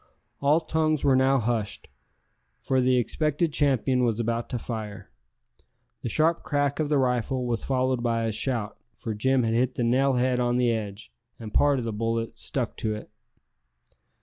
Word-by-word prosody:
All 145 +3 +4
tongues 155 -1 0
were 135 -2 +4
now 135 +1 +4
hushed, 115 -3 -2 0.7
for 130 -1 +1
the 125 0 +3
expected 150 +5 0
champion 130 -3 +2
was 115 -2 +1
about 115 0 -1
to 125 - -2
fire. 110 -4 -6 0.9
The - - -3
sharp 160 +7 +2
crack 145 -1 -1
of 155 -2 0
the 150 - +3
rifle 125 0 0
was 120 -3 -1
followed 130 -2 0
by 115 -1 0
a 115 - 0
shout, 110 -1 -2 0.2
for 110 - -4
Jim 130 +4 +2
had 115 0 0
hit 125 +2 +1
the 120 - -1
nail 130 +3 +3
head 125 0 +1
on 120 0 +1
the 125 -1 +3
edge, 105 -1 -5 0.2
and 110 -3 -9
part 145 -1 +4
of 125 - -3
the 115 - -3
bullet 115 +1 -2
stuck - - -3
to 110 -1 -1
it. 105 - -10
125 Hz, 175 wpm, -26 LUFS, 115-135 Hz, 0.9 s, All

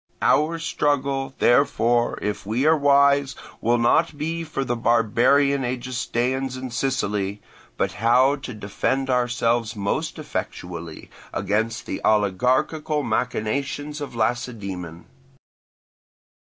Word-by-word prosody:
Our 160 +2 +3
struggle, 140 -3 -1
therefore, 120 -2 +2
if 105 0 -2
we 115 +7 -1
are 160 +1 +6
wise, 140 -1 +3 0.3
will 120 +2 +2
not 155 +6 +2
be 165 +3 -3
for 150 -4 -3
the 120 - -1
barbarian 120 +5 +3
Egestaeans 125 +1 -2
in 130 -1 -6
Sicily, 105 -6 -1 0.4
but - - 0
how 125 +5 +3
to 130 -4 -8
defend 130 +6 -1
ourselves 120 -2 +1
most 100 -1 -2
effectually 85 -2 -6 0.2
against 110 +4 -1
the - - -5
oligarchical 130 - +1
machinations 140 +6 -2
of 140 -4 -6
Lacedaemon. 105 -8 -3
125 Hz, 105 wpm, -23 LUFS, 110-140 Hz, 0.4 s, are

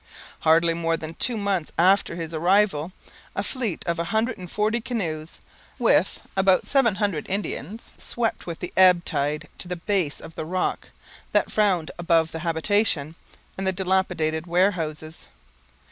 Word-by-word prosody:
Hardly 165 +1 +4
more 165 0 0
than 160 0 -7
two 235 +6 0
months 200 -6 -1
after 190 +2 +3
his 165 -1 -5
arrival, 175 -1 +2 0.4
a - - -1
fleet 235 - -3
of 170 -1 -1
a 170 - 0
hundred 220 +5 0
and 180 -1 -8
forty 215 +4 0
canoes, 170 -10 -4 0.4
with - - +2
about 190 -1 +3
seven 265 -7 +3
hundred 200 -7 -2
Indians, 200 +1 -4
swept 230 -5 -2
with 170 -2 -6
the 180 - -5
ebb 180 -2 +6
tide 150 -1 -1
to - - -5
the 180 - -3
base 175 -4 -1
of 165 - -11
the - - -5
rock 180 +4 -2 0.4
that - - +2
frowned 190 -7 +1
above 165 -2 +2
the 165 - -5
habitation 165 -1 +1 0.5
and 190 - -1
the - - +3
dilapidated 180 -4 0
warehouses. 165 -4 -1
180 Hz, 155 wpm, -24 LUFS, 160-200 Hz, 0.5 s, ebb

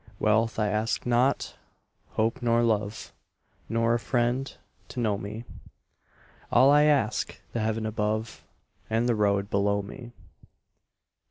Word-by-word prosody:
Wealth 110 +2 +2
I 105 -1 +1
ask 110 +2 -1
not, 125 +3 +1 0.6
hope 110 +2 0
nor 120 0 +2
love, 110 -2 -1 0.6
Nor 115 0 +2
a 120 - +1
friend 125 +2 0 0.4
to - - -7
know 110 -4 +1
me; 110 +4 -7 1.1
All 135 +2 +6
I 150 +1 +6
ask, 140 -8 +1
the 120 - -1
heaven 110 0 -1
above 110 +1 -2 0.5
And 115 +2 +1
the 120 - +3
road 100 -2 +1
below 100 0 +1
me. 120 +4 -10
115 Hz, 125 wpm, -27 LUFS, 105-120 Hz, 1.1 s, All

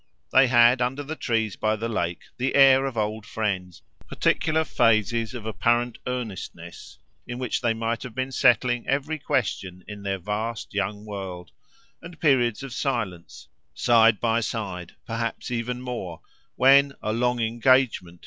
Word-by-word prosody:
They 130 0 +6
had 120 +1 +5
under 130 +4 -1
the 155 +3 -5
trees 110 - -1
by 110 0 0
the 110 +2 -3
lake 85 -7 -2 0.2
the 130 +2 -1
air 135 -1 +6
of 125 -4 -6
old 110 0 -2
friends 100 -5 -4 0.2
particular 160 0 +1
phases 115 -2 +1
of 115 -3 -7
apparent 120 +2 0
earnestness 125 -7 -6 0.3
in 120 0 -5
which 125 -1 -2
they 115 -2 +1
might 115 0 -2
have 125 -3 -8
been 130 +1 -2
settling 120 -1 +2
every 145 +3 -1
question 100 - -2
in 105 -1 -8
their 100 -1 -2
vast 105 +5 -4
young 105 +1 -2
world; 95 -4 -7 0.5
and 170 -1 -11
periods 130 -7 +2
of 135 -3 -7
silence, 105 - -4 0.3
side 115 -3 +4
by 115 -1 +1
side, 95 -7 -4
perhaps 115 +1 -4
even 125 +1 -3
more, 105 -10 -6 0.3
when 140 +1 +5
"A 110 - -1
long 125 +1 0
engagement!" 115 -6 +1
115 Hz, 150 wpm, -25 LUFS, 105-125 Hz, 0.5 s, They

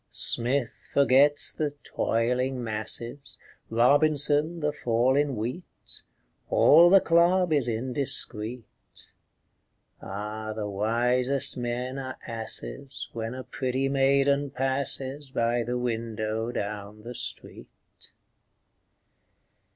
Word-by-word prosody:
Smith 125 +1 -1
forgets 140 +1 +4
the 150 -2 -3
"toiling 125 +3 -1
masses," 115 +4 -3 0.3
Robinson, 145 +6 +3
the 150 -1 0
fall 125 -1 +1
in 145 -2 +1
wheat; 120 +11 -7 0.5
All 170 +4 +6
the 195 +2 +7
club 175 0 +3
is 140 -5 +2
indiscret. 120 -1 -2 1.4
Ah, 105 +2 -5
the 105 -1 -4
wisest 120 +6 +1
men 125 +2 -3
are 130 -1 -6
asses 115 +4 -5
When 115 +1 -4
a 130 - -6
pretty 130 0 -2
maiden 140 +1 +2
passes 135 +1 -2
By 120 -1 0
the 120 +2 -2
window 115 -1 -3
down 105 0 -5
the 120 +2 -7
street! - - -7
125 Hz, 95 wpm, -27 LUFS, 115-140 Hz, 1.4 s, the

